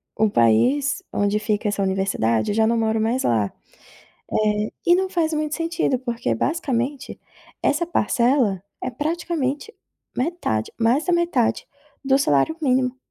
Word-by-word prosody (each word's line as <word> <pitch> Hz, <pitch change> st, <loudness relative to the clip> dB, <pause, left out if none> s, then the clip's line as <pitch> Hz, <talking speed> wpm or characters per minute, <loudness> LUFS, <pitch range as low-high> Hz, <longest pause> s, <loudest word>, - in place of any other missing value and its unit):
o 220 Hz, 0 st, +2 dB
país 250 Hz, -, +2 dB
onde 205 Hz, +1 st, +1 dB
fica 210 Hz, 0 st, -1 dB
essa 205 Hz, -1 st, -1 dB
universidade, 190 Hz, -, 0 dB
eu 205 Hz, -, -2 dB
já 220 Hz, -, +3 dB
não 230 Hz, +1 st, +1 dB
moro 220 Hz, -1 st, +1 dB
mais 235 Hz, +4 st, 0 dB
lá, 110 Hz, -4 st, +1 dB, 0.8 s
eh, 210 Hz, 0 st, +1 dB, 0.2 s
e 345 Hz, -, +6 dB
não 380 Hz, +1 st, +1 dB
faz 330 Hz, -3 st, 0 dB
muito 305 Hz, 0 st, -1 dB
sentido, 330 Hz, -5 st, 0 dB
porque 235 Hz, -, -2 dB
basicamente 270 Hz, -, -2 dB, 0.4 s
essa 300 Hz, +4 st, +1 dB
parcela 235 Hz, -, +1 dB, 0.2 s
é 255 Hz, -, -2 dB
praticamente 310 Hz, -, -2 dB, 0.4 s
metade, 255 Hz, -, -2 dB
mais 235 Hz, +6 st, +2 dB
da 355 Hz, -, +1 dB
metade 340 Hz, -9 st, +1 dB, 0.4 s
do 270 Hz, 0 st, +4 dB
salário 150 Hz, -, +2 dB
mínimo. 255 Hz, -1 st, +1 dB
250 Hz, 140 wpm, -22 LUFS, 210-300 Hz, 0.8 s, e